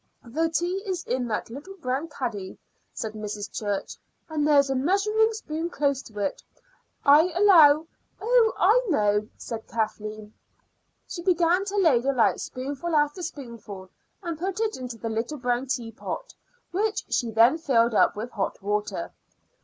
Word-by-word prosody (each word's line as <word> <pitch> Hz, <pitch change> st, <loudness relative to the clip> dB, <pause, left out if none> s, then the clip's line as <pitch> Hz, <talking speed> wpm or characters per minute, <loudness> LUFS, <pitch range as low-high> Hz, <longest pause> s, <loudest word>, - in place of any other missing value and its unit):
"The 320 Hz, +8 st, 0 dB
tea 350 Hz, +4 st, -1 dB
is 365 Hz, -3 st, -2 dB
in 250 Hz, -1 st, -2 dB
that 220 Hz, 0 st, -3 dB
little 290 Hz, +10 st, -9 dB
brown 275 Hz, -2 st, -2 dB
caddy," 230 Hz, -10 st, -5 dB, 0.3 s
said 220 Hz, -1 st, -5 dB
Mrs. 210 Hz, -1 st, -5 dB
Church, 205 Hz, -2 st, -3 dB, 0.3 s
"and 300 Hz, -2 st, 0 dB
there's 280 Hz, -2 st, +4 dB
a -, -, 0 dB
measuring 400 Hz, +10 st, +2 dB
spoon 335 Hz, -6 st, -4 dB
close 280 Hz, -5 st, 0 dB
to 215 Hz, -5 st, -14 dB
it. 200 Hz, -2 st, -2 dB, 0.6 s
I 310 Hz, +5 st, +6 dB
allow 325 Hz, -6 st, +7 dB, 0.2 s
" -, -, -43 dB
"Oh, 465 Hz, 0 st, +3 dB
I 445 Hz, +7 st, +4 dB
know," 210 Hz, -7 st, +2 dB
said 225 Hz, -1 st, -7 dB
Kathleen. 215 Hz, -1 st, -4 dB, 0.7 s
She 345 Hz, -, -6 dB
began 355 Hz, +1 st, +2 dB
to 400 Hz, 0 st, -4 dB
ladle 275 Hz, -8 st, +3 dB
out -, -, +3 dB
spoonful 280 Hz, +6 st, -4 dB
after 295 Hz, +4 st, +1 dB
spoonful 230 Hz, -, -8 dB, 0.3 s
and 335 Hz, -3 st, -4 dB
put 380 Hz, +3 st, -3 dB
it 440 Hz, -1 st, 0 dB
into 250 Hz, -2 st, -7 dB
the 225 Hz, -, -5 dB
little 225 Hz, +7 st, -3 dB
brown 245 Hz, 0 st, -1 dB
teapot, 245 Hz, -, -5 dB, 0.4 s
which 420 Hz, +4 st, -1 dB
she 235 Hz, -, +1 dB
then 230 Hz, +8 st, +4 dB
filled 235 Hz, -7 st, +2 dB
up -, -, +4 dB
with 225 Hz, +4 st, -5 dB
hot 200 Hz, -3 st, -3 dB
water. 210 Hz, +1 st, -2 dB
280 Hz, 155 wpm, -26 LUFS, 225-345 Hz, 0.7 s, allow